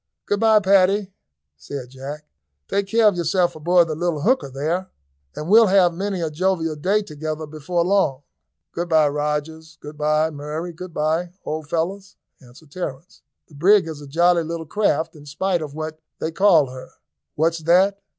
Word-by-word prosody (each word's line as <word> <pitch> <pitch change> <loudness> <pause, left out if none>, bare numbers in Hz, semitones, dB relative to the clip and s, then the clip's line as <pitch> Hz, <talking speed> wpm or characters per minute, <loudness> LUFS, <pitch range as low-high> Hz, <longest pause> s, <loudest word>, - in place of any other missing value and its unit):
"Good 205 - 0
bye, 220 -1 +5
Paddy," 195 0 +3 0.4
said 125 - -8
Jack; 140 +3 -8 0.4
"take 200 -1 -1
care 225 +1 +4
of 205 - +3
yourself 175 +1 +1
aboard 170 +2 +3
the 155 - -3
little 165 -1 -2
hooker 255 - +1
there, 160 +8 -2 0.5
and 150 - -5
we'll 220 +3 +7
have 185 -2 +4
many 190 +1 -3
a 160 -2 -2
jovial 165 -1 0
day 195 +8 +1
together 155 -1 -5
before 155 +3 -2
long." 180 -8 +1 0.5
"Good 175 +1 -4
bye, 155 -2 +4
Rogers; 150 +2 -3
good 150 0 -11
bye, 155 +1 +2
Murray; 150 +4 -5
good 180 +2 -9
bye, 160 +3 -1
old 155 -1 -4
fellows," 190 +5 -3 0.3
answered 140 +4 -18
Terence. 165 -1 -7 0.3
"The - - -21
brig 185 +5 +4
is 155 -2 -7
a 145 - -10
jolly 170 +4 +3
little 165 0 -5
craft, 180 -2 0
in 145 -1 -14
spite 175 +4 -1
of 150 -2 -7
what 155 0 -5 0.2
they 160 - -3
call 165 -7 +4
her." 130 0 -11 0.4
"What's 165 +2 +1
that?" 185 +5 +3
165 Hz, 170 wpm, -22 LUFS, 150-185 Hz, 0.5 s, we'll